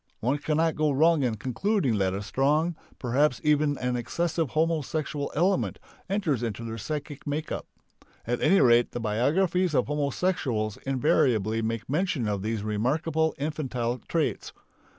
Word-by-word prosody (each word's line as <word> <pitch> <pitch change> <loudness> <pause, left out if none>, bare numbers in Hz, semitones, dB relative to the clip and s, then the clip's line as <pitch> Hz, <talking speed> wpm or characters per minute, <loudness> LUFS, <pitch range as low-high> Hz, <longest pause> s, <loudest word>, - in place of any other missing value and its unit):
One 135 +6 0
cannot 160 +2 +1
go 155 0 +1
wrong 155 +3 +4
in 120 -4 0
concluding 130 - 0
that 95 -1 +1
a 100 - -4
strong, 150 +9 +1 0.2
perhaps 130 +2 +1
even 150 -1 +2
an 125 0 -1
excessive 165 +5 -1
homosexual 155 -2 -1
element 185 +5 +1 0.3
enters 180 - 0
into 115 -1 -3
their 115 0 -5
psychic 145 +5 -5
make 150 +2 -3
up. - - -4 0.6
At 120 +1 -1
any 195 - +5
rate 120 -1 +4
the 120 - -3
biographies 155 - +1
of 125 - +3
homosexuals 140 - -1
invariably 125 - +2
make 115 0 -3
mention 150 - 0
of 100 -2 -1
these 110 0 -2
remarkable 150 +10 0
infantile 130 -5 -2
traits. 165 -3 -1
140 Hz, 145 wpm, -27 LUFS, 115-160 Hz, 0.6 s, any